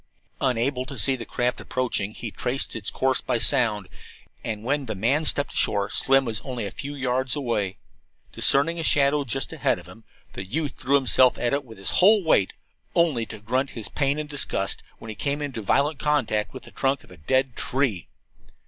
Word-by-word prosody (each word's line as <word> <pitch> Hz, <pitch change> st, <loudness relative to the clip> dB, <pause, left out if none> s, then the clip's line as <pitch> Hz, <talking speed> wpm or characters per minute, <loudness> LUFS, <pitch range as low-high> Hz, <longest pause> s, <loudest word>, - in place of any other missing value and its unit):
Unable 125 Hz, +1 st, 0 dB
to 140 Hz, -1 st, -7 dB
see 130 Hz, +5 st, +3 dB
the 115 Hz, -4 st, -8 dB
craft 125 Hz, 0 st, -1 dB
approaching, 120 Hz, -5 st, -2 dB
he 115 Hz, -, -6 dB
traced 125 Hz, +4 st, -2 dB
its 105 Hz, -3 st, 0 dB
course 130 Hz, -1 st, 0 dB
by -, -, 0 dB
sound, 110 Hz, -4 st, +2 dB, 0.6 s
and 110 Hz, -2 st, -4 dB
when 140 Hz, +2 st, -1 dB
the 110 Hz, -, -3 dB
man 135 Hz, +11 st, +2 dB
stepped 145 Hz, -1 st, +3 dB
ashore 100 Hz, 0 st, +1 dB
Slim 135 Hz, +4 st, +3 dB
was 110 Hz, -2 st, -3 dB
only 125 Hz, -5 st, -5 dB
a 100 Hz, -, -5 dB
few 145 Hz, +1 st, -6 dB
yards 130 Hz, 0 st, 0 dB
away. 115 Hz, -9 st, -2 dB, 0.5 s
Discerning 165 Hz, +5 st, +3 dB
a -, -, -2 dB
shadow 145 Hz, -1 st, +3 dB
just 135 Hz, 0 st, -2 dB
ahead -, -, +1 dB
of -, -, -12 dB
him, 115 Hz, -, -14 dB, 0.3 s
the 95 Hz, -, -6 dB
youth 145 Hz, +9 st, -3 dB
threw 135 Hz, +2 st, +1 dB
himself 130 Hz, -2 st, +4 dB
at 120 Hz, +1 st, -1 dB
it 140 Hz, 0 st, 0 dB
with 115 Hz, -4 st, -13 dB
his 95 Hz, -, -3 dB
whole 205 Hz, +2 st, +5 dB
weight, 105 Hz, -, +2 dB, 0.4 s
only 150 Hz, -10 st, +2 dB
to 110 Hz, -, -8 dB
grunt 130 Hz, +6 st, -1 dB
his 110 Hz, -, -4 dB
pain 140 Hz, 0 st, 0 dB
and 150 Hz, 0 st, -4 dB
disgust 135 Hz, -9 st, -1 dB, 0.2 s
as -, -, -11 dB
he 110 Hz, -, -5 dB
came 140 Hz, +6 st, -1 dB
into 140 Hz, -6 st, -4 dB
violent 140 Hz, +8 st, +1 dB
contact 140 Hz, -8 st, +1 dB
with 130 Hz, -, -10 dB
the -, -, -13 dB
trunk 135 Hz, 0 st, -1 dB
of -, -, -19 dB
a 90 Hz, -, -13 dB
dead 130 Hz, -, 0 dB
tree. 125 Hz, -, -1 dB
130 Hz, 200 wpm, -24 LUFS, 110-140 Hz, 0.6 s, whole